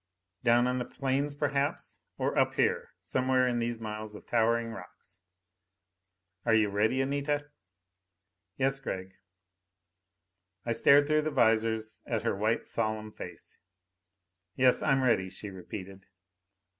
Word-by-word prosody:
Down 120 +1 +4
on 125 0 0
the 125 - -2
plains, 140 +2 -1
perhaps? 145 -1 -2 0.2
Or - - -1
up - - +2
here, - - 0
somewhere 130 0 +1
in 120 -1 0
these 115 0 -2
miles 110 -1 -6
of - - -11
towering 115 0 +1
rocks? 95 -4 -11 1.2
"Are 115 -2 +3
you 110 -2 +3
ready, 110 +6 +1
Anita?" 145 +1 -2 1.1
"Yes, 135 0 +2
Gregg." 95 -7 -5 1.5
I 115 - -1
stared 140 +5 +6
through 155 +1 +2
the 155 - -1
visors 110 -4 +1
at - - -1
her - - 0
white - - 0
solemn 110 +1 -2
face. - - -10 1.0
"Yes, 130 -1 +4
I'm 135 -3 +2
ready," 95 -7 +2
she 100 +1 -8
repeated. 95 +1 -9
120 Hz, 130 wpm, -30 LUFS, 110-135 Hz, 1.5 s, stared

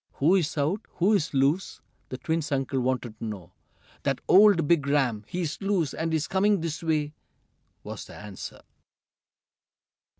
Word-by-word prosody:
"Who's 165 +1 +2
out? 155 +9 0
Who's 190 -2 +2
loose?" 145 +7 +1 0.3
the 130 - -5
twins' 160 +1 -2
uncle 135 -1 0
wanted 125 -3 -2
to - - -8
know. 100 -5 -6 0.5
"That - - -1
old 195 -5 +6
big 150 -4 +3
ram! 130 -7 +1
He's 170 -2 -3
loose, 195 -7 0
and 165 0 -2
he's 160 -1 0
coming 200 0 +2
this 160 -2 -3
way!" 155 -2 0 0.7
was - - -7
the - - -12
answer. 100 -2 -9
155 Hz, 140 wpm, -27 LUFS, 135-175 Hz, 0.7 s, old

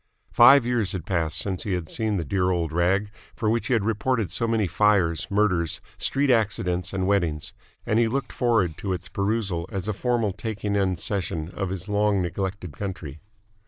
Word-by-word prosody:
Five 140 -3 +7
years 120 -5 0
had 90 -4 -5
passed 85 -4 -1
since 95 -2 -2
he 105 -4 -2
had 90 -3 -2
seen 110 0 -1
the 85 - -2
dear 90 +4 +1
old 85 -3 0
rag 95 +4 +1 0.2
for 110 -2 0
which 115 0 0
he 130 - +1
had 110 -4 +1
reported 115 0 0
so 115 - 0
many 115 -2 +1
fires, 90 -2 +2
murders, 95 -5 +1 0.2
street 140 0 +1
accidents, 95 -6 0
and 95 -1 -1
weddings: 85 -7 0 0.3
and 110 - +2
he 115 - +3
looked 135 +4 -3
forward 110 - +1
to 95 -2 -2
its 90 0 -5
perusal 100 -4 -1
as 95 0 -3
a 110 - 0
formal 115 -1 0
taking 105 +1 -4 0.2
seisin 85 -3 -3
of 95 -2 -3
his 95 0 -5
long 105 -1 +2
neglected 90 0 -3
country. 90 -7 -6
100 Hz, 185 wpm, -25 LUFS, 90-110 Hz, 0.3 s, Five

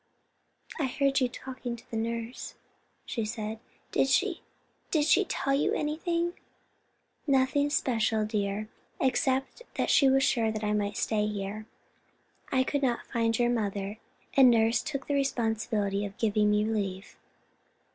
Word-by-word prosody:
"I 280 - +1
heard 275 +1 +1
you 255 - +2
talking 255 -1 -6
to 230 0 -10
nurse," 230 +1 -4 0.5
she 230 - -2
said. 215 0 -4 0.3
"Did - - +2
she—did 335 -3 -1
she—tell 305 -6 +2
you—anything?" 335 +4 0 0.9
"Nothing 275 +1 +3
special, 225 -6 +1
dear, 210 -1 -2 0.3
except 265 - 0
that - - +1
she 275 -3 +6
was 270 0 +4
sure 235 -4 +2 0.2
I 210 0 +1
might 205 -1 -1
stay 210 -1 +1
here. 210 +1 -4 0.8
I 260 -1 +3
could 285 +2 -1
not 245 -3 0
find 230 -1 +1
your 240 0 +2
mother, 205 -2 -2 0.4
and 265 -2 +8
nurse 225 0 +3
took 280 -3 -4
the 285 - -2
responsibility 225 -6 0
of 200 -1 -6
giving 210 -1 +2
me 210 0 +2
leave." 200 -3 -3
235 Hz, 130 wpm, -29 LUFS, 215-270 Hz, 0.9 s, and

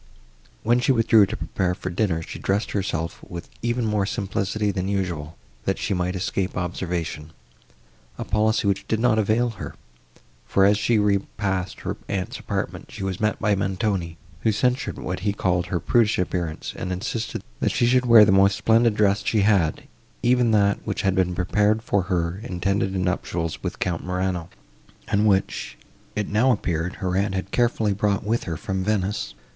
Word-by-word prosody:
When 120 +2 +3
she 125 - +2
withdrew 115 -4 +5
to - - -4
prepare 90 -1 -1
for 95 - -5
dinner, 85 -3 0
she - - -8
dressed 100 +2 0
herself 85 -5 -3
with 85 -1 -8
even 120 0 0
more 105 -2 +1
simplicity 100 0 -1
than 95 -1 -2
usual, 85 -5 -3 0.3
that - - 0
she - - -1
might 90 0 -1
escape 95 +1 -2
observation—a 75 -9 -6
policy, 110 0 +1
which 100 -1 0
did 110 - 0
not 115 -2 +3
avail 110 +3 +2
her, - - -6 0.7
for, 95 - +4
as 100 +1 +4
she 115 +2 +2
repassed 100 -2 0
to - - -14
her - - -3
aunt's 100 +7 -3
apartment, 100 -2 -4
she - - -7
was 95 -1 -3
met 105 0 +1
by 105 - +2
Montoni, 95 -3 -1 0.2
who 110 - +2
censured 125 +5 0
what 90 +1 -4
he 100 +2 0
called 90 -3 0
her 90 -1 -1
prudish 115 +1 +2
appearance, 85 -3 -2
and 90 - -4
insisted, 110 +5 -3 0.2
that - - +1
she - - +2
should 125 +1 +3
wear 115 -3 +9
the 100 - +3
most 100 +1 +4
splendid 115 0 +3
dress 100 -1 +2
she 110 - +2
had, 95 -6 +2 0.4
even 125 0 +3
that, 100 -2 +3
which - - -3
had 95 -1 +2
been 90 -2 +1
prepared 105 +4 +1
for 100 - +1
her 90 -1 -1
intended 95 -1 -1
nuptials 90 -3 -2
with - - -4
Count 85 -2 -2
Morano, 90 -2 -2 0.6
and 105 +1 +2
which, 100 -1 0 0.4
it 105 -1 -1
now 110 +6 +3
appeared, 85 -5 -1
her 90 -1 -2
aunt 100 0 0
had 95 +1 -4
carefully 115 -4 +2
brought 100 0 0
with 115 +3 -1
her 80 -2 -3
from 95 +4 -3
Venice. 105 0 -1
100 Hz, 175 wpm, -24 LUFS, 90-110 Hz, 0.7 s, wear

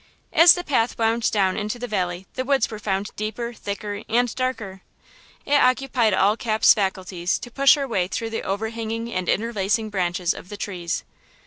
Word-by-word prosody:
As 335 +2 +8
the 355 - -4
path 250 -7 0
wound 230 0 +1
down 190 -3 +2
into 210 +2 -3
the 245 +1 -5
valley 180 -3 -2
the 255 - -2
woods 270 -3 +1
were 215 - -6
found 200 -1 -2
deeper, 220 +3 -4
thicker 205 -1 -5
and 240 +1 +2
darker. 220 -7 -3 0.6
It 285 - -1
occupied 250 -4 +2
all 200 +3 +3
Cap's 220 -2 +4
faculties 190 -2 -1
to 240 - -9
push 275 +4 +5
her 280 -2 -3
way 185 -7 0
through 225 +4 -4
the 225 - -3
overhanging 225 +3 -3
and 185 -1 -2
interlacing 215 0 0
branches 180 -2 0
of 180 - -11
the 205 - -7
trees. 175 -5 -4
215 Hz, 180 wpm, -23 LUFS, 195-235 Hz, 0.6 s, As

